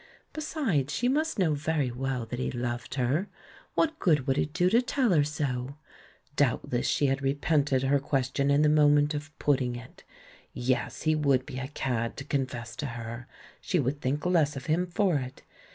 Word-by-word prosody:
Besides, 245 - -1
she 245 - 0
must 310 +3 +1
know 175 -6 +2
very 150 -3 0
well 130 -1 -2
that 120 +2 -5
he 130 - -1
loved 120 0 -4
her 140 +10 0 0.2
— - - -24
what 320 -1 +1
good 150 -8 +2
would 135 -2 +1
it 145 - -1
do 180 +3 +2
to 230 +6 +4
tell 250 -2 +1
her 155 -5 +4
so? 140 -3 -3 0.3
— 135 +3 -30
doubtless 125 -3 +1
she 145 - +2
had 135 0 +1
repented 140 -1 +1
her 140 +1 +3
question 135 0 0
in 140 +1 +4
the - - +5
moment 150 0 +4
of 150 +1 -5
putting 130 -4 +1
it! 120 +1 -11 0.5
Yes, 125 +1 -1
he 155 0 +3
would 140 -4 +2
be 130 - -6
a 130 - -4
cad 120 -5 -2
to - - -5
confess 130 -4 -3
to 145 +1 -3
her 120 0 -7 0.2
— - - -24
she 180 - 0
would 140 +1 -1
think 140 +4 -1
less 160 -5 +2
of 135 -1 -6
him 170 +3 +1
for 180 -2 +1
it. 130 -1 -6
140 Hz, 200 wpm, -28 LUFS, 130-155 Hz, 0.5 s, the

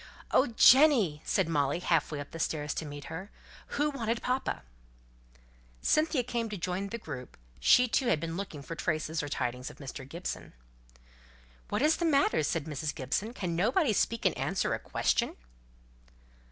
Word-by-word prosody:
"Oh, 270 - +4
Jenny!" 245 - +6
said 190 -4 +1
Molly, 145 -3 +1
half 165 -4 +1
way 150 - -3
up 145 - -7
the 165 - -7
stairs 150 -2 -1
to 160 - -4
meet 145 0 -7
her, 185 +7 -7 0.5
"who 295 +1 +2
wanted 230 -4 -2
papa?" 255 +1 -1 1.2
Cynthia 310 - +2
came 235 -2 -2
to 210 - -4
join 185 +2 -2
the 230 - -4
group; 135 - -8 0.2
she 250 - +6
too 250 +2 +1
had 205 -10 +3
been 165 +1 -4
looking 175 -7 -6
for 165 - -6
traces 160 -1 -1
or 145 - -5
tidings 125 -2 -2
of - - -13
Mr. 135 -1 -8
Gibson. 170 +4 -6 1.2
"What - - 0
is 310 +2 +4
the 340 - -1
matter?" 280 - +3
said 155 0 -1
Mrs. 155 0 -3
Gibson. 155 - -2
"Can 175 -3 -2
nobody 220 - +2
speak 230 +3 0
and - - +3
answer - - 0
a - - -2
question?" - - 0
170 Hz, 170 wpm, -30 LUFS, 150-235 Hz, 1.2 s, Jenny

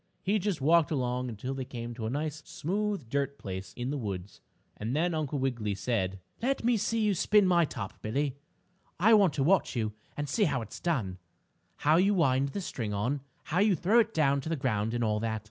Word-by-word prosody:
He 205 +3 +2
just 195 -6 -1
walked 160 +3 +4
along 125 -3 -1
until 120 +4 -4
they 135 -1 -3
came 120 -1 -6
to 115 -2 -4
a - - -1
nice, 150 +3 -3
smooth 200 - -2
dirt 140 +3 -1
place 95 -1 -6
in 125 +2 -3
the 145 - -2
woods, 100 -4 -5 0.3
and 115 +5 -3
then 170 +3 +1
Uncle 150 -2 -1
Wiggily 120 -6 -1
said: 95 -4 -1 0.2
"Let 265 +2 0
me 240 +1 +3
see 225 +2 0
you 210 -1 +3
spin 205 +3 +4
my 175 -2 +4
top, 110 -9 -7
Billie. 135 +5 -1 0.6
I 220 +6 +6
want 200 -7 +5
to 135 - 0
watch 185 +1 +3
you 110 -3 -1 0.2
and 145 0 -2
see 210 - +2
how 135 -8 0
it's 110 - -9
done 110 - -1 0.7
how 155 +2 +6
you 200 +3 +4
wind 135 -5 +3
the 200 - -4
string 110 - -3
on, 125 +8 -1 0.2
how 175 - -1
you 205 -1 +4
throw 195 +9 +4
it 225 -1 +2
down 140 -5 +2
to 160 - -5
the 165 - +1
ground 115 -5 -1
and 120 - 0
all 105 -1 +1
that. 110 0 -1
140 Hz, 215 wpm, -30 LUFS, 115-175 Hz, 0.7 s, I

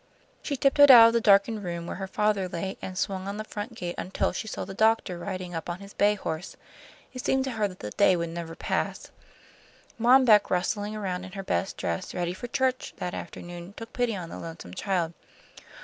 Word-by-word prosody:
She 280 - -3
tiptoed 280 +2 +6
out 235 -3 +11
of - - -3
the 235 - +2
darkened 205 +1 +4
room 170 -2 -4
where - - -5
her 195 - -4
father 205 -1 0
lay, 190 +3 -4
and 185 -1 -6
swung 190 -1 -2
on 200 +1 -4
the 215 - -3
front 215 +2 -6
gate 175 -4 -4
until 185 - -1
she 220 - -4
saw - - -4
the - - -8
doctor 220 -4 +2
riding 185 -1 -5
up 165 +1 -5
on 175 +1 -4
his 200 +1 -11
bay 205 +1 +3
horse. 160 -3 -5 0.6
It 255 - -6
seemed 265 0 +2
to 265 - -3
her 215 -3 0
that 185 -2 -12
the 105 - -5
day 190 - +4
never 170 -1 -4
would - - -14
pass. - - -2 0.9
Mom 255 +3 +6
Beck, 210 -3 +6
rustling 205 +3 -1
around 185 -3 -3
in 185 0 -10
her 195 -1 -5
best 85 - -1
dress 85 -2 -3
ready 175 -1 -1
for 215 +6 -7
church, 255 +1 -1
that 180 - -4
afternoon, 175 +2 -8
took 225 0 -9
pity 245 -3 0
on 175 -3 -6
the - - -7
lonesome 165 - -8
child. 175 - -1
195 Hz, 215 wpm, -27 LUFS, 175-220 Hz, 0.9 s, out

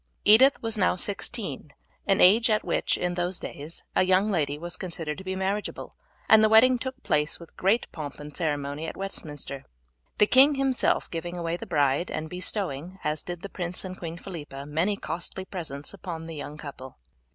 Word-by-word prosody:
Edith 255 +6 +7
was 225 -1 0
now 185 - +3
sixteen, 190 - -3 0.3
an 195 - +3
age 220 +6 +6
at 215 -1 +2
which, - - 0
in 180 0 -1
those 175 +1 -1
days, 155 +1 -6
a - - +4
young 190 +3 +3
lady 145 -6 0
was 175 +3 -5
considered 165 -3 -5
to - - -9
be 190 0 -3
marriageable, 195 +2 -3 0.3
and 220 0 +7
the 215 - +5
wedding 245 +3 +6
took 260 +2 -6
place 150 0 +1
with 170 -1 -14
great 200 +6 +2
pomp 145 -4 -7
and 150 0 -9
ceremony 145 -1 -2
at - - -6
Westminster; 145 -8 -3 0.5
the 210 - +6
king 270 +6 +6
himself 270 -2 +1
giving 175 +1 -4
away 170 -1 -2
the 175 - -7
bride, 145 +3 +2
and 155 0 -4
bestowing, 180 -2 -2
as 150 0 0
did 175 -1 -7
the - - -4
prince 180 -1 -4
and 185 0 -7
Queen 165 -1 -5
Philippa, 150 -7 -8
many 165 +8 0
costly 175 +3 -5
presents 160 -6 -6
upon 170 -4 -6
the 165 -1 -7
young 145 0 -7
couple. 140 -4 -9
175 Hz, 185 wpm, -27 LUFS, 150-195 Hz, 0.5 s, Edith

